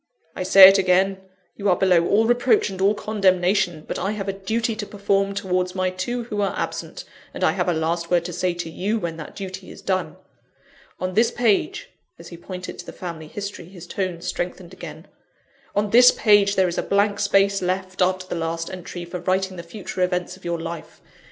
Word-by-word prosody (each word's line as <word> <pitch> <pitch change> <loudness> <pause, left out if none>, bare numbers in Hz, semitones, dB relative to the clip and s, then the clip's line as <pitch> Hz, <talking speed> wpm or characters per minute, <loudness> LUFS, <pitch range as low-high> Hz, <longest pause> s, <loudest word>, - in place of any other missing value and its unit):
"I - - -5
say 190 +1 +9
it 195 +1 +5
again: 190 +1 +2 0.4
you 200 -1 -1
are 180 - +5
below 180 -2 +3
all 220 +2 +3
reproach 240 -3 +2
and 190 0 -6
all 200 +2 +3
condemnation; 185 -5 +1
but - - -4
I 195 +3 -1
have 200 -2 -5
a 195 - -1
duty 220 +4 -2
to 210 - -4
perform 200 -1 0
towards 180 -1 -1
my 185 -1 0
two 240 +7 -3
who 210 -3 -3
are 200 - -1
absent, - - -4 0.3
and - - -4
I - - +4
have - - -1
a - - +2
last 165 +1 -1
word 175 -1 +2
to 175 - -5
say 180 +1 -1
to 175 -1 -5
you 205 +7 -1
when 170 -5 -4
that 155 - -9
duty 190 -1 -7
is - - -12
done. 185 -1 -1 0.8
On 185 0 -3
this 230 +3 +4
page 240 - 0
" - - -51
(as - - -12
he 170 - -9
pointed 185 +1 -8
to - - -8
the - - -6
family 165 -3 -7
history, 200 0 -7
his 180 -1 -12
tones 175 -1 -4
strengthened 175 0 -4
again) 160 0 -10 0.7
"on 205 0 0
this 245 +2 +8
page 205 -2 +4
there 190 -1 +3
is 175 - -2
a - - +2
blank 205 +1 +1
space 195 0 +2
left, 185 +1 -2
after 185 0 +1
the - - -6
last 165 0 -3
entry, 175 -1 -7
for 180 +1 -6
writing 190 +1 -1
the 170 - -6
future 180 +2 -7
events 180 0 -1
of 190 - -20
your 170 -1 -2
life. 165 0 -7
185 Hz, 215 wpm, -23 LUFS, 175-200 Hz, 0.8 s, say